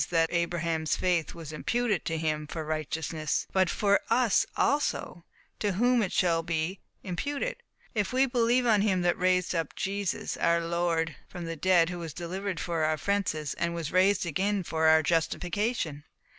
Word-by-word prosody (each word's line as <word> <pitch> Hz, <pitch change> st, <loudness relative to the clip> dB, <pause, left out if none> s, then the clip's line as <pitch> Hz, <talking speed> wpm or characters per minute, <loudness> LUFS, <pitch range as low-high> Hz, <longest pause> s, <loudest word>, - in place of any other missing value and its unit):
that 165 Hz, -1 st, +2 dB
Abraham's 170 Hz, -2 st, 0 dB
faith 175 Hz, -3 st, 0 dB
was 160 Hz, -2 st, -8 dB
imputed 240 Hz, +7 st, -1 dB
to 165 Hz, -1 st, -1 dB
him 155 Hz, -1 st, -1 dB
for 160 Hz, 0 st, -5 dB
righteousness), 155 Hz, 0 st, -2 dB
but 185 Hz, -2 st, +3 dB
FOR 200 Hz, -1 st, +3 dB
US 245 Hz, -5 st, +3 dB
ALSO, 280 Hz, -, 0 dB, 0.3 s
to 205 Hz, -2 st, 0 dB
whom 245 Hz, +5 st, +3 dB
it 190 Hz, -, -1 dB
shall 170 Hz, -2 st, +2 dB
be 165 Hz, +3 st, -2 dB, 0.2 s
imputed, 285 Hz, -, -3 dB, 0.4 s
if 210 Hz, -3 st, 0 dB
we 260 Hz, +2 st, +4 dB
believe 245 Hz, -1 st, +2 dB
on 215 Hz, -4 st, +4 dB
him 190 Hz, -4 st, +1 dB
that 175 Hz, 0 st, +3 dB
raised 185 Hz, 0 st, +1 dB
up 165 Hz, -3 st, -2 dB
Jesus, 200 Hz, -1 st, -2 dB
our 170 Hz, 0 st, +3 dB
Lord, 165 Hz, -3 st, -1 dB
from 175 Hz, -2 st, -7 dB
the 165 Hz, 0 st, -4 dB
dead, 175 Hz, +1 st, +3 dB
who 175 Hz, -, -5 dB
was 165 Hz, -2 st, -6 dB
delivered 185 Hz, +2 st, -4 dB
for 165 Hz, -2 st, -1 dB
our 155 Hz, 0 st, +2 dB
offences, 155 Hz, -4 st, -1 dB
and 170 Hz, 0 st, -2 dB
was 165 Hz, -3 st, -4 dB
raised 185 Hz, +1 st, +3 dB
again 190 Hz, +5 st, 0 dB
for 160 Hz, -1 st, +1 dB
our 160 Hz, 0 st, +6 dB
justification." 170 Hz, -, -1 dB
175 Hz, 170 wpm, -28 LUFS, 160-200 Hz, 0.4 s, our